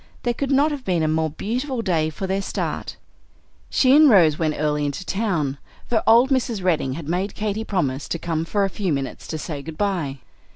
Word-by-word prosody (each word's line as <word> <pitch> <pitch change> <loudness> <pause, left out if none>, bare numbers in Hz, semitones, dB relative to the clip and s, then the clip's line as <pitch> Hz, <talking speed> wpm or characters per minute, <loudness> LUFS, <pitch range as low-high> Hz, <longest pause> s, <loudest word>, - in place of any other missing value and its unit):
There 240 - +1
could 275 +3 -3
not 285 +3 +3
have 285 -3 -5
been 175 -6 0
a - - +2
more 160 0 +1
beautiful 240 - -3
day 165 -6 +1
for 160 +5 -5
their 190 +1 -1
start. - - -4 0.7
She 260 0 +4
and 305 0 +8
Rose 165 - +5
went 155 -2 0
early 150 -1 0
into 145 +5 -3
town, 170 -11 -1 0.3
for 225 -2 +1
old 235 +4 +6
Mrs. 235 -6 0
Bedding 155 -7 +1
had 150 +1 -7
made 180 +5 -2
Katy 215 0 -2
promise 145 -10 -1
to - - -2
come 165 -1 -2
for 200 +4 0
a 195 - +1
few 190 -3 -2
minutes 135 -2 -3
to 160 - -4
say 150 -2 -5
good 155 +2 -9
by. 175 -9 -1
180 Hz, 210 wpm, -22 LUFS, 155-225 Hz, 0.7 s, and